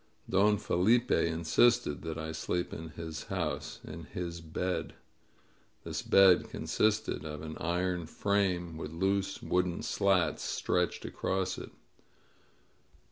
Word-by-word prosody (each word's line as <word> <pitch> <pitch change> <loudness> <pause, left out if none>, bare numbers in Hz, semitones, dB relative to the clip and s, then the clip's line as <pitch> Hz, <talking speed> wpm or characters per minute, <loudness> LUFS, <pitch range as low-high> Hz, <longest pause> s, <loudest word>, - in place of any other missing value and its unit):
Don 105 +2 +4
Felipe 105 +5 +2
insisted 85 +4 +3
that 80 -1 -4
I 80 0 -4
sleep 90 +2 -2
in 80 0 -6
his 80 -1 -7
house, - - -3
in - - -8
his 85 -1 -5
bed. 90 +3 -3 0.9
This - - -3
bed 95 -2 +5
consisted 110 -7 0
of 75 -1 -6
an 80 0 -6
iron 90 0 -1
frame 90 -4 0
with 75 - -5
loose 95 +3 -1
wooden 90 -1 0
slats 95 -3 +2
stretched 90 -1 -1
across 95 -1 -2
it. - - -8
90 Hz, 120 wpm, -31 LUFS, 80-95 Hz, 0.9 s, bed